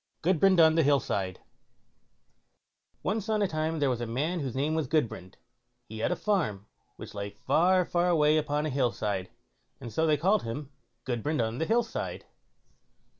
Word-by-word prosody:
GUDBRAND 185 +2 +4
ON 160 -1 +7
THE 165 - +3
HILL 145 -2 +4
SIDE 95 -6 -3 1.6
Once 215 +2 -2
on 215 -1 +2
a - - +2
time 160 0 -2
there 145 -3 +1
was 120 -1 -3
a 120 - -3
man 150 +10 -1
whose 130 -5 -4
name 145 +4 0
was 160 -3 -1
Gudbrand; 120 - -2 0.5
he 110 0 -7
had 115 - 0
a - - +1
farm 160 - -1 0.3
which - - -10
lay 100 0 -4
far, 175 - +2
far 175 +1 +1
away 155 -2 +4
upon 150 0 0
a 155 - -2
hill 130 -3 +1
side, 100 -5 -3 0.5
and 115 - -8
so 160 +8 +1
they 150 -1 +3
called 195 +7 +2
him 135 +5 -6 0.3
Gudbrand 130 +5 -2
on 115 +1 -1
the 160 - -1
Hill 235 +2 +3
side. 225 - -5
150 Hz, 180 wpm, -28 LUFS, 120-175 Hz, 1.6 s, ON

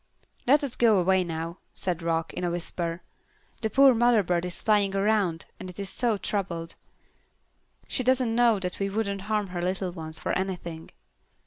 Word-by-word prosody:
"Let 290 +4 +5
us 270 -4 -3
go 225 -4 +4
away 185 +1 +3
now," 165 0 -5 0.2
said 180 -2 -2
Rock, 165 -1 -1
in - - -4
a 175 - +1
whisper. 170 0 -3 0.6
"The 220 - 0
poor 270 +2 +6
mother 235 -2 +4
bird 175 -1 0
is 180 - -6
flying 205 -2 +3
around, 195 -5 +1
and 185 - -7
is 195 -1 -4
so 230 -3 0
troubled. 175 -4 -3 1.1
She - - -1
doesn't 255 -2 +2
know 235 -2 +4
that 180 -1 -3
we 195 0 0
wouldn't 200 -1 -2
harm 210 -2 0
her 175 -1 -4
little 185 +1 -1
ones 160 -2 -7
for - - -3
anything." 175 -4 -3
190 Hz, 175 wpm, -27 LUFS, 175-220 Hz, 1.1 s, poor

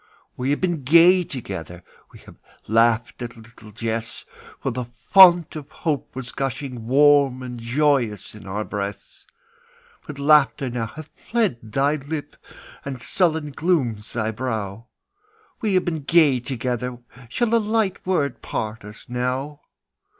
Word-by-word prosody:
We 125 +2 -2
have 145 - +1
been 175 -5 0
gay 170 +6 +6
together; 95 - -7 0.3
We - - -14
have - - -16 0.3
laughed 115 +2 +2
at 120 -1 -6
little 115 -1 -15
jests; 115 +1 -5 0.3
For - - -2
the 125 +1 -4 0.3
fount 175 -4 +7
of 150 -2 -8
hope 155 -6 -3
was 130 -1 -6
gushing 130 -3 -4
Warm 140 -1 +4
and 125 -1 -7
joyous 120 - 0
in 105 -3 -12
our 105 +3 -3
breasts, 100 -1 -6 0.8
But 145 - -7
laughter 140 -2 +3
now 115 -2 -2
hath 155 +7 -11 0.2
fled 220 - +1
thy 135 +7 0
lip, 145 +1 -6 0.5
And 135 -2 -6
sullen 160 +1 0
glooms 135 - -1
thy 110 -2 -1
brow; 110 -2 -4 0.7
We 210 -4 +1
have 185 - +2
been 160 -3 -2
gay 145 -3 +4
together, 125 0 -3 0.3
Shall 235 - 0
a 230 - +5
light 215 -3 0
word 155 -8 -1
part 110 0 -4
us 105 +1 -12
now? 130 +4 -3
130 Hz, 145 wpm, -22 LUFS, 115-155 Hz, 0.8 s, fount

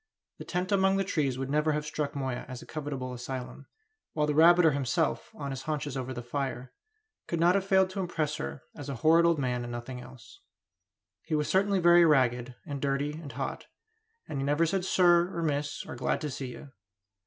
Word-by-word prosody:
The - - -7
tent 180 +2 -2
among 195 -1 +3
the 195 - +1
trees 145 -9 -1
would 135 +1 -3
never 150 +1 +2
have 150 0 -2
struck 150 -1 -3
Moya 130 -3 -3
as 130 -1 -8
a - - -13
covetable 140 -4 -5
asylum, 125 +2 -6 0.5
while 150 -1 +1
the 150 - 0
rabbiter 165 +1 +6
himself, 140 +3 -1
on 140 -2 -5
his 135 -1 -5
haunches 150 -2 -3
over 130 -1 -4
the 120 -1 -5
fire, 130 0 -4 0.5
could 170 - -2
not 175 +2 +5
have 195 0 0
failed 190 -1 +4
to 195 - -5
impress 155 -5 -1
her 70 0 -6
as 145 -1 -7
a 140 - -3
horrid 165 +2 +6
old 170 -1 +3
man 125 -3 -1
and 120 0 -6
nothing 120 +1 -6
else. 120 -4 -14 0.8
He 155 - -2
was 150 -1 0
certainly 195 +1 +3
very 175 0 +7
ragged, 125 -5 +2
and 140 -4 -5
dirty, 140 +1 0
and 150 -1 -8
hot; - - -5 0.6
and 140 - -4
he - - -1
never 145 +4 +2
said 185 +2 -1
"sir," 175 -1 +4
or 170 - -1
"miss," 145 -1 -2
or - - -7
"glad 125 - -1
to 150 -2 -3
see 130 0 -5
you." 130 +3 -10
145 Hz, 210 wpm, -29 LUFS, 130-170 Hz, 0.8 s, very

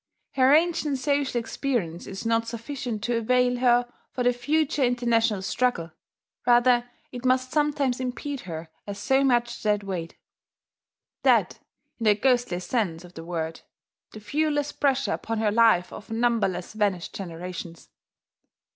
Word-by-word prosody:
Her 260 0 +4
ancient 310 -2 +3
social 275 -1 0
experience 225 - -3
is 195 +3 -7
not 230 0 +1
sufficient 235 -1 -5
to 240 0 0
avail 250 +2 +2
her 245 -1 +3 0.2
for 250 - -2
the 245 0 +3
future 295 +4 0
international 230 -4 +1
struggle, 215 -6 0 0.6
rather 245 0 +4 0.2
it 245 -1 -7
must 255 0 +1
sometimes 290 -4 +1
impede 260 +2 -4
her 160 0 -6 0.2
as 200 -1 -5
so 265 +7 +2
much 240 -3 +1
dead 210 -1 +1
weight. 180 -4 -5 1.0
Dead, - - +3 0.4
in 225 - -3
the 210 -1 +5
ghostliest 240 -7 +1
sense 180 -9 -1
of 180 0 -14
the 165 - -8
word, 165 -1 -4 0.5
the 215 - -10
viewless 290 +5 -1
pressure 275 -1 +1
upon 225 0 -3
her 215 -1 +1
life 220 -5 +4
of 210 - -10
numberless 225 -6 0
vanished 200 -5 -1
generations. 175 -2 -7
240 Hz, 140 wpm, -26 LUFS, 200-255 Hz, 1.0 s, the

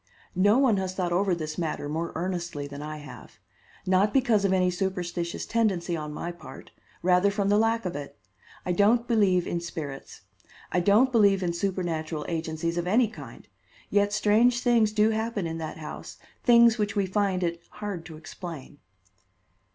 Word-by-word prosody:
No 205 +4 +5
one 260 -6 +3
has 190 -1 -3
thought 180 -2 -1
over 190 0 +2
this 155 -1 -5
matter 155 -3 -3
more 165 +3 -3
earnestly 175 -4 -3
than 145 0 -8
I 155 +1 -6
have. 150 0 -12 0.5
Not 190 +4 +2
because 240 -6 +3
of 195 - +2
any 185 -1 +2
superstitious 175 -2 -3
tendency 190 -7 0
on 150 -2 -5
my 170 +3 -5
part; 155 -6 -12 0.3
rather 180 +2 +4
from 200 -1 -1
the 205 - +4
lack 225 -1 +1
of 180 - -3
it. 140 -1 -7 0.5
I 180 - 0
don't 220 +6 +3
believe 195 -6 +3
in 170 - -2
spirits. 150 -5 -7 0.5
I 180 - +2
don't 210 +8 +4
believe 200 -5 +4
in 170 -1 0
supernatural 170 -4 -2
agencies 165 +1 -2
of 175 - -3
any 225 +4 +3
kind; - - -12 0.4
yet 205 0 +2
strange 225 +4 +3
things 235 -4 +3
do 215 +1 +3
happen 220 -3 -2
in 165 0 -4
that 160 -1 -6
house, 155 -1 -8 0.3
things 235 -1 +6
which 210 +1 -1
we 200 -2 +1
find 190 -1 0
it 170 0 -2
hard 205 -5 -6
to 160 -2 -10
explain." 160 -3 -9
185 Hz, 175 wpm, -26 LUFS, 170-210 Hz, 0.5 s, things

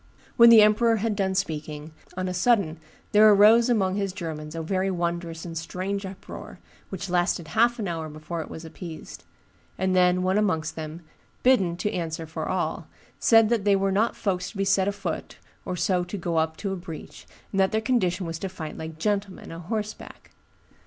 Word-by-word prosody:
When 235 0 +8
the 225 -2 +9
emperor 225 +2 +4
had 220 0 -1
done 190 -2 0
speaking, 155 -4 -3 0.3
on 185 0 -1
a 185 - -2
sudden 180 -4 +2 0.3
there 215 +1 +7
arose 215 +4 +6
among 195 -5 +1
his 200 -2 -2
Germans 160 -4 -6
a 165 - -3
very 190 +3 0
wondrous 170 -2 -3
and 165 -1 -7
strange 190 +4 -3
uproar, 195 +1 -10 0.3
which 190 0 -5
lasted 175 -2 0
half 235 +2 +3
an 215 -4 -3
hour 165 -2 -4
before 155 +2 -6
it - - -8
was 160 - -8
appeased; 160 -1 -9 0.5
and 185 0 0
then 180 0 +4
one 190 +3 +2
amongst 160 -7 0
them, 160 +1 -6 0.4
bidden 195 -10 +3
to 210 +4 -2
answer 165 -1 -3
for 160 - -5
all, - - -2 0.3
said 225 -2 +5
that 230 -4 +1
they 200 -1 +4
were 195 0 +1
not 215 +4 +1
folks 185 -3 -2
to 215 - -11
be 195 - 0
set 195 0 +2
afoot 200 -5 -4 0.3
or 185 - -3
so 180 0 +1
to 180 +3 -5
go 170 -2 -2
up 160 0 0
to 195 -2 -3
a - - -2
breach, 175 -3 -9 0.3
and 195 - 0
that 190 0 +3
their 220 - +1
condition 200 -7 0
was 165 -1 -5
to 195 - -4
fight 160 -4 -7
like 160 0 -7
gentlemen, 200 +1 -2
a 165 - -7
horseback. 210 +4 -6
185 Hz, 195 wpm, -25 LUFS, 165-205 Hz, 0.5 s, the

